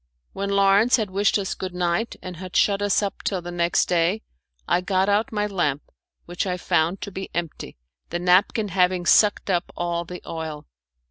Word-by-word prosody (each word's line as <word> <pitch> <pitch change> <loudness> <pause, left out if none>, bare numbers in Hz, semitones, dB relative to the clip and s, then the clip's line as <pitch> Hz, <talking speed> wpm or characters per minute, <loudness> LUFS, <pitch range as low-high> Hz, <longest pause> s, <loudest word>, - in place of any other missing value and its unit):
When 200 +1 -3
Lawrence 200 +4 +4
had 215 -5 -2
wished 200 +2 +2
us 195 -2 -2
good 185 -1 -6
night 180 +6 -1
and 180 -2 -7
had 185 0 -9
shut 200 -1 +3
us 205 0 +2
up 200 - -4
till 190 - -1
the 175 0 -7
next 175 0 +1
day, 175 +4 +1 0.4
I 180 - +2
got 190 +1 +1
out 205 +2 +1
my 210 -1 0
lamp, 175 -8 -1 0.4
which 175 +3 -3
I 180 -1 -1
found 170 +1 0
to 200 - -6
be 190 0 -6
empty, 170 - -5 0.3
the 170 - -2
napkin 185 +4 +2
having 180 -1 +1
sucked 205 +1 +4
up 175 -1 -1
all 170 0 -1
the 180 +1 -9
oil. 160 -2 -6
185 Hz, 190 wpm, -23 LUFS, 175-200 Hz, 0.4 s, Lawrence